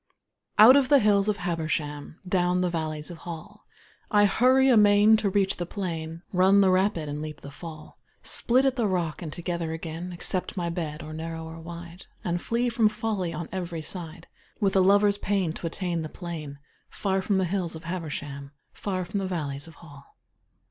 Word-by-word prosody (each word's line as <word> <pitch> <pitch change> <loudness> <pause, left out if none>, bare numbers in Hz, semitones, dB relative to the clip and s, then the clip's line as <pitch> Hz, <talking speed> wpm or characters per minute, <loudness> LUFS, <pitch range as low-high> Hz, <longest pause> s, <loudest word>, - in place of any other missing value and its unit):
Out 225 +5 +9
of 275 -2 +3
the 285 - +7
hills 205 -3 +3
of 210 - 0
Habersham, 155 -4 -3
Down 180 0 +2
the 180 -1 0
valleys 155 -1 -4
of 170 - -9
Hall, 175 +6 -9 0.4
I 205 -1 +5
hurry 255 +5 +4
amain 210 -2 +6
to 215 -2 0
reach 195 0 +1
the 175 - -4
plain, 165 -3 -5
Run 190 +2 +5
the 190 -1 +4
rapid 185 -4 +1
and 145 +1 -4
leap 155 -1 -7
the 140 - -9
fall, 155 0 -10 0.2
Split 255 +3 +4
at 270 0 +1
the 230 -3 +2
rock 175 -5 -1
and 160 -3 -5
together 170 -1 -3
again, 165 +2 -6
Accept 180 +2 -1
my 170 -1 -1
bed, 160 -3 -4
or 155 0 -8
narrow 160 0 -5
or 160 0 -9
wide, 170 +2 -10 0.2
And 175 0 -1
flee 235 +1 0
from 230 -2 +3
folly 210 -5 -2
on 165 0 -5
every 175 -4 -4
side 170 -1 -5 0.3
With 200 -3 +1
a 190 - +6
lover's 200 +1 +4
pain 190 -5 0
to 170 - -5
attain 175 -1 -2
the 155 - -5
plain 155 -6 -7 0.3
Far 195 -1 -1
from 200 +1 0
the 190 -1 +2
hills 180 -2 -2
of 160 - -9
Habersham, 145 -5 -5 0.2
Far 185 -3 -3
from 200 - -3
the 195 - -2
valleys 145 -5 -4
of 165 - -13
Hall. 145 -4 -16
175 Hz, 190 wpm, -26 LUFS, 160-200 Hz, 0.4 s, Out